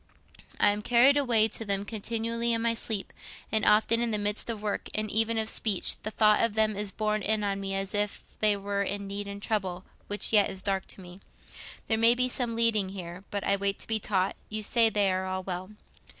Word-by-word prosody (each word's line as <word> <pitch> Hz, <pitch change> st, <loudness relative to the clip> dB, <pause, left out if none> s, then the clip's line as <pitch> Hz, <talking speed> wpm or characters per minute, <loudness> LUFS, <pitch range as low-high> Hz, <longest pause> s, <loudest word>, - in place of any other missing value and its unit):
I 205 Hz, -, +5 dB
am 205 Hz, +1 st, -3 dB
carried 245 Hz, +5 st, +5 dB
away 240 Hz, -6 st, +3 dB
to 225 Hz, -, -4 dB
them 200 Hz, -1 st, -2 dB
continually 230 Hz, +2 st, -2 dB
in 230 Hz, 0 st, -1 dB
my 230 Hz, 0 st, +2 dB
sleep, 220 Hz, -3 st, -3 dB, 0.4 s
and 220 Hz, -1 st, +1 dB
often 220 Hz, +2 st, +3 dB
in 240 Hz, -, +1 dB
the 215 Hz, -, 0 dB
midst 205 Hz, +2 st, -2 dB
of 225 Hz, -2 st, -3 dB
work, 210 Hz, -1 st, -3 dB
and 215 Hz, 0 st, -1 dB
even 225 Hz, +1 st, +2 dB
of 220 Hz, 0 st, 0 dB
speech, 215 Hz, -4 st, +2 dB
the 215 Hz, -, -4 dB
thought 215 Hz, -1 st, +3 dB
of 230 Hz, -2 st, 0 dB
them 215 Hz, -1 st, +2 dB
is 205 Hz, 0 st, 0 dB
borne 215 Hz, +1 st, -2 dB
in 215 Hz, +1 st, 0 dB
on 200 Hz, -1 st, -2 dB
me 195 Hz, 0 st, -2 dB
as 195 Hz, +1 st, -2 dB
if 205 Hz, 0 st, -1 dB, 0.2 s
they 210 Hz, -1 st, +3 dB
were 200 Hz, 0 st, -3 dB
in 200 Hz, 0 st, -3 dB
need 200 Hz, +1 st, -5 dB
and 200 Hz, 0 st, -8 dB
trouble, 190 Hz, -4 st, -2 dB, 0.2 s
which 205 Hz, +2 st, 0 dB
yet 210 Hz, -2 st, +5 dB
is 190 Hz, -, -5 dB
dark 195 Hz, -2 st, -2 dB
to -, -, -9 dB
me. 180 Hz, +1 st, -13 dB, 0.7 s
There 220 Hz, -1 st, 0 dB
may 230 Hz, +1 st, +6 dB
be 250 Hz, +1 st, +1 dB
some 240 Hz, -2 st, -2 dB
leading 225 Hz, -4 st, +2 dB
here; 180 Hz, -1 st, -8 dB
but 200 Hz, -1 st, -4 dB
I 200 Hz, -, +2 dB
wait 200 Hz, 0 st, -1 dB
to -, -, -6 dB
be 220 Hz, -1 st, +1 dB
taught. 195 Hz, -2 st, -1 dB
You 215 Hz, 0 st, -2 dB
say 230 Hz, +1 st, +4 dB
they 205 Hz, -2 st, +1 dB
are 185 Hz, 0 st, -2 dB
all 185 Hz, 0 st, -4 dB
well. 185 Hz, 0 st, -5 dB
210 Hz, 230 wpm, -27 LUFS, 200-225 Hz, 0.7 s, may